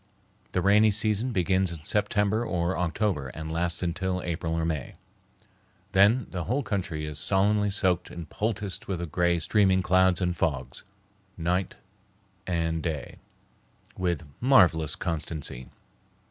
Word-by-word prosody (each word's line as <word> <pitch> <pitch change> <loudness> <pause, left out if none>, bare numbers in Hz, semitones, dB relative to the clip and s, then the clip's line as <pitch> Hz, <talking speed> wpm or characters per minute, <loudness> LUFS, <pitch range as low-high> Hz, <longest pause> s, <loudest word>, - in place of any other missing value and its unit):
The 90 - 0
rainy 105 +3 +5
season 110 +3 0
begins 95 -2 +1
in 80 -3 -8
September 105 +3 +1
or 90 -4 -1
October 90 -4 -1
and 80 +5 -7
lasts 85 +2 -1
until 90 +2 -1
April 80 -1 -2
or 80 0 0
May. 80 -5 -3 1.0
Then 105 +5 +4
the 90 -2 -3
whole 135 +6 0
country 90 -8 -3
is 75 -1 -3
solemnly 105 +4 +2
soaked 95 -3 0
and 85 -2 -8
poulticed 105 0 -3
with 95 - -2
the 85 - -3
gray, 85 +2 +1
streaming 95 +1 +2
clouds 95 -1 +3
and 90 -1 0
fogs, 70 -6 -2 0.5
night 90 +2 -1 0.7
and 80 -2 -1
day, 80 -3 -4 0.8
with 85 -3 -1 0.2
marvelous 90 - +4
constancy. 80 -6 -4
90 Hz, 130 wpm, -27 LUFS, 80-100 Hz, 1.0 s, rainy